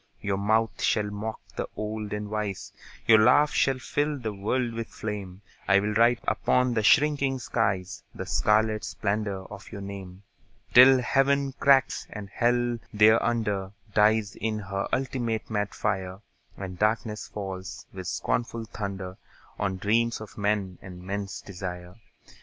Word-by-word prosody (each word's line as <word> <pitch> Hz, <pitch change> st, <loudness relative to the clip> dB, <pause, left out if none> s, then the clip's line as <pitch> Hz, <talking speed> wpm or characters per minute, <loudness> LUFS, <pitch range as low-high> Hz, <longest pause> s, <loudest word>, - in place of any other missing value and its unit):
Your 100 Hz, -1 st, -2 dB
mouth 110 Hz, +2 st, +1 dB
shall 105 Hz, -2 st, +1 dB
mock 105 Hz, +2 st, -4 dB, 0.2 s
the -, -, -3 dB
old 105 Hz, 0 st, -4 dB
and 105 Hz, 0 st, -3 dB
wise, 105 Hz, -3 st, -3 dB, 0.3 s
Your 110 Hz, -1 st, +7 dB
laugh 145 Hz, +7 st, +5 dB
shall 135 Hz, -1 st, +2 dB
fill 145 Hz, +3 st, -1 dB
the 110 Hz, -5 st, -4 dB
world 115 Hz, +5 st, -1 dB
with 115 Hz, 0 st, -4 dB
flame, 100 Hz, -3 st, -6 dB, 0.2 s
I'll 100 Hz, +2 st, +3 dB
write 115 Hz, +2 st, +4 dB
upon 125 Hz, -1 st, +2 dB
the 110 Hz, -, +1 dB
shrinking 140 Hz, +2 st, +3 dB
skies 100 Hz, -7 st, -1 dB
The -, -, -5 dB
scarlet 110 Hz, 0 st, +2 dB
splendour 100 Hz, -2 st, -2 dB
of 100 Hz, -1 st, -10 dB
your 100 Hz, -, -7 dB
name, 100 Hz, -1 st, -8 dB, 0.5 s
Till 130 Hz, +1 st, +8 dB
Heaven 135 Hz, +2 st, +2 dB
cracks, 135 Hz, -2 st, +3 dB
and 100 Hz, -3 st, -8 dB
Hell 120 Hz, 0 st, +1 dB
thereunder 105 Hz, -2 st, +2 dB, 0.2 s
Dies 105 Hz, -1 st, +3 dB
in 110 Hz, 0 st, -2 dB
her 100 Hz, -1 st, -3 dB
ultimate 120 Hz, -4 st, -2 dB
mad 105 Hz, -1 st, -1 dB
fire, 95 Hz, -2 st, -2 dB, 0.4 s
And 95 Hz, -2 st, -7 dB
darkness 105 Hz, 0 st, 0 dB
falls, 95 Hz, -2 st, -6 dB
with 95 Hz, -2 st, -7 dB
scornful 115 Hz, +4 st, -2 dB
thunder, 100 Hz, -3 st, -6 dB, 0.4 s
On 95 Hz, -1 st, -1 dB
dreams 115 Hz, +4 st, +1 dB
of 110 Hz, -2 st, -10 dB
men 100 Hz, -3 st, -1 dB
and 90 Hz, -1 st, -10 dB
men's 100 Hz, +1 st, -4 dB
desire. 90 Hz, -2 st, -7 dB
105 Hz, 140 wpm, -27 LUFS, 100-115 Hz, 0.5 s, Till